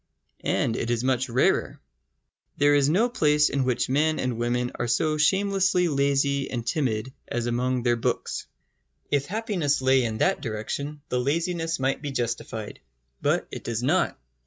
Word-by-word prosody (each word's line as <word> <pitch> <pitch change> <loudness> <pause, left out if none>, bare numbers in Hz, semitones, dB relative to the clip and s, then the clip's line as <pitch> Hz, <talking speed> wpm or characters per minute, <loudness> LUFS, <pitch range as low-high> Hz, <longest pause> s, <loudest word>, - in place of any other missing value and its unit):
And 115 - 0
it 115 - -2
is 120 0 0
much 130 0 +1
rarer. 120 +2 +1 0.8
There 145 0 +4
is 145 -1 +4
no 205 +10 +3
place 150 -10 +3
in 135 -2 0
which 125 -1 0
men 155 +4 +2
and 125 -3 -2
women 120 +1 0
are 120 - -3
so 155 +6 +1
shamelessly 190 +1 +3
lazy 140 -1 +1
and 120 -2 -4
timid 130 -3 -1
as 120 -1 -2
among 125 +1 0
their 120 -1 +3
books. 115 - -2 0.6
If 145 -1 +1
happiness 200 - 0
lay 130 0 +3
in 110 -2 -2
that 190 +5 +1
direction, 140 +5 -4
the 125 - 0
laziness 165 +4 -1
might 135 +1 0
be 145 - -4
justified. 115 -4 -4 0.4
But - - +1
it - - -7
does 115 0 -3
not. 160 +8 +1
135 Hz, 160 wpm, -25 LUFS, 120-150 Hz, 0.8 s, There